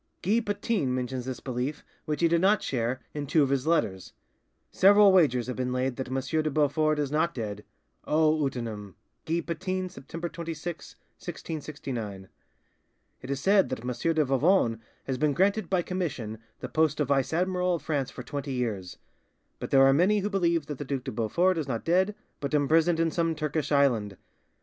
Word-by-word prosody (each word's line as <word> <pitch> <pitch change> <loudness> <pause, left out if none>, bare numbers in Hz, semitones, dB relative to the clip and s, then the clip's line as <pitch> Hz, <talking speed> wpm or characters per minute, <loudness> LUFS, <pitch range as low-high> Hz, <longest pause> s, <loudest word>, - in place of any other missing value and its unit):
Guy 210 +6 +3
Patin 205 - -1
mentions 125 0 -3
this 130 -2 -5
belief, 130 +3 -4 0.2
which 150 0 -2
he 170 - +5
did 170 0 +2
not 200 +2 +3
share, 125 0 -1
in 145 -1 -4
two 155 +1 +4
of 135 - 0
his 135 +1 0
letters:— 95 - 0 0.6
"Several 205 +1 +6
wagers 140 -10 +4
have 125 - -4
been 125 0 -1
laid 125 0 -1
that 130 - -4
M. 130 +1 -1 0.2
de 155 - -1
Beaufort 155 +1 +2
is 145 -2 -1
not 160 +3 +1
dead! 105 -3 -5 0.4
'O 155 0 +4
utinam'!" 110 -7 -4 0.3
(Guy 170 +1 0
Patin, 185 +2 -3
September 165 +3 -7
26, 170 0 -6 0.2
1669). 125 - -6 0.9
"It 130 - -9
is 140 -1 -1
said 195 +6 +4
that 130 - -4
M. 125 +7 0
de 155 -2 +3
Vivonne 135 - +2 0.2
has 130 -2 -3
been 150 0 +2
granted 195 +3 +1
by 185 -2 +1
commission 140 - -4 0.2
the - - -4
post 155 -1 +1
of 145 -3 0
vice 135 -2 +2
admiral 180 +1 +1
of 170 - -7
France 145 -4 -1
for 125 - -9
twenty 140 +1 -4
years; 105 -8 -3 0.6
but - - -5
there 135 -1 +6
are 135 - +6
many 195 +8 +3
who 205 +2 -2
believe 170 -5 +1
that 145 -2 -6
the - - -3
Duc 135 -1 -3
de 130 - -4
Beaufort 170 +11 +1
is 150 - -3
not 115 -4 -3
dead, 185 +5 +2 0.2
but 145 +1 -2
imprisoned 160 +3 +3
in 165 -1 +2
some 165 -1 0
Turkish 150 -1 -2
island. 120 -9 +2
150 Hz, 185 wpm, -27 LUFS, 130-170 Hz, 0.9 s, Several